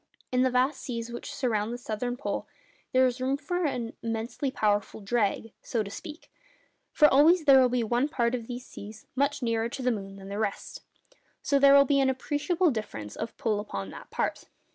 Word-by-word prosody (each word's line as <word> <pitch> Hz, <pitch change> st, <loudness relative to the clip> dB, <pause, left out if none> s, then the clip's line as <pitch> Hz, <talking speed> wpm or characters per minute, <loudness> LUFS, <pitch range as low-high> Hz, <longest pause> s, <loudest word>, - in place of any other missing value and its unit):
In 250 Hz, 0 st, +2 dB
the 260 Hz, -, +4 dB
vast 255 Hz, +3 st, +1 dB
seas 235 Hz, -2 st, -5 dB
which 240 Hz, +4 st, -6 dB
surround 230 Hz, -6 st, -1 dB
the 240 Hz, -, -4 dB
Southern 245 Hz, +1 st, -3 dB
Pole 285 Hz, -, -3 dB, 0.4 s
there 260 Hz, 0 st, +5 dB
is 255 Hz, 0 st, -1 dB
room 265 Hz, +2 st, +1 dB
for 355 Hz, +4 st, -2 dB
an 240 Hz, -5 st, -2 dB
immensely 230 Hz, +4 st, -3 dB
powerful 210 Hz, -5 st, 0 dB
'drag,' 215 Hz, +1 st, -1 dB
so 225 Hz, -3 st, -1 dB
to 200 Hz, -, -8 dB
speak; 300 Hz, +9 st, -9 dB, 0.6 s
for 300 Hz, -, +6 dB
always 310 Hz, +5 st, +5 dB
there 270 Hz, -2 st, +8 dB
will 250 Hz, -, +4 dB
be 245 Hz, -1 st, 0 dB
one 240 Hz, +6 st, +1 dB
part 235 Hz, -4 st, 0 dB
of 235 Hz, -3 st, -3 dB
these 245 Hz, 0 st, -6 dB
seas 215 Hz, +2 st, -11 dB
much 280 Hz, 0 st, 0 dB
nearer 230 Hz, -1 st, 0 dB
to 260 Hz, +2 st, -6 dB
the 250 Hz, -, +2 dB
moon 195 Hz, -3 st, -5 dB
than 195 Hz, 0 st, -10 dB
the 200 Hz, +1 st, -4 dB
rest, 210 Hz, -2 st, -3 dB, 0.3 s
and -, -, -28 dB, 0.3 s
so 280 Hz, -1 st, +2 dB
there 275 Hz, 0 st, +7 dB
will 280 Hz, 0 st, +7 dB
be 275 Hz, 0 st, +3 dB
an 270 Hz, -1 st, +3 dB
appreciable 295 Hz, +6 st, 0 dB
difference 160 Hz, -, -5 dB
of 225 Hz, -, -6 dB
pull 220 Hz, -6 st, 0 dB
upon 100 Hz, -, -5 dB
that -, -, -11 dB
part. -, -, -2 dB
245 Hz, 210 wpm, -28 LUFS, 220-275 Hz, 0.6 s, there